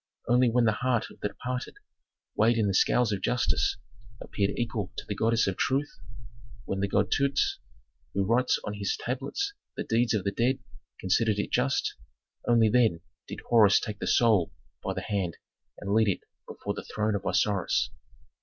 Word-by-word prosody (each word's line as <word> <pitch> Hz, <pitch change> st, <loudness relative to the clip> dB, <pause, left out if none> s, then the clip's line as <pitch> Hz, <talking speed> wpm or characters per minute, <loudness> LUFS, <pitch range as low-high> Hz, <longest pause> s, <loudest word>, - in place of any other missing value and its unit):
Only 125 Hz, 0 st, +4 dB
when 120 Hz, +1 st, +3 dB
the 110 Hz, -, +4 dB
heart 125 Hz, -3 st, 0 dB
of -, -, -17 dB
the -, -, -1 dB
departed, 125 Hz, +4 st, -5 dB, 0.6 s
weighed 115 Hz, +2 st, +3 dB
in 110 Hz, -, +2 dB
the 100 Hz, -, +1 dB
scales 115 Hz, +4 st, +3 dB
of 100 Hz, -2 st, -2 dB
justice, 90 Hz, -12 st, +1 dB, 0.4 s
appeared 100 Hz, -1 st, -1 dB
equal 110 Hz, -4 st, -2 dB
to -, -, -5 dB
the 105 Hz, -, -2 dB
goddess 115 Hz, +2 st, +2 dB
of 95 Hz, -2 st, -2 dB
truth, 140 Hz, +2 st, 0 dB, 0.7 s
when 95 Hz, -, -3 dB
the 100 Hz, -, +1 dB
god 100 Hz, 0 st, +1 dB
Dutes, 140 Hz, -1 st, +1 dB, 0.6 s
who 100 Hz, 0 st, +1 dB
writes 120 Hz, +5 st, +2 dB
on 105 Hz, -, -4 dB
his 100 Hz, -1 st, -2 dB
tablets 400 Hz, -, -3 dB, 0.2 s
the -, -, -2 dB
deeds 115 Hz, 0 st, +1 dB
of 100 Hz, -, -1 dB
the 100 Hz, -, 0 dB
dead, 120 Hz, +6 st, +1 dB, 0.4 s
considered 105 Hz, +3 st, +1 dB
it 105 Hz, -, -2 dB
just, -, -, +1 dB, 0.5 s
only 115 Hz, -2 st, +5 dB
then 110 Hz, -7 st, +3 dB, 0.3 s
did -, -, -7 dB
Horus 110 Hz, -4 st, +6 dB
take 105 Hz, -1 st, -6 dB
the -, -, -3 dB
soul 110 Hz, -8 st, +3 dB, 0.3 s
by -, -, -2 dB
the -, -, -3 dB
hand 95 Hz, -5 st, -2 dB, 0.4 s
and 100 Hz, 0 st, -3 dB
lead 110 Hz, 0 st, +4 dB
it 100 Hz, -, 0 dB, 0.3 s
before -, -, -5 dB
the -, -, -6 dB
throne 110 Hz, 0 st, +1 dB
of 100 Hz, -, -2 dB
Osiris. 100 Hz, -4 st, +1 dB
110 Hz, 180 wpm, -28 LUFS, 100-120 Hz, 0.7 s, Horus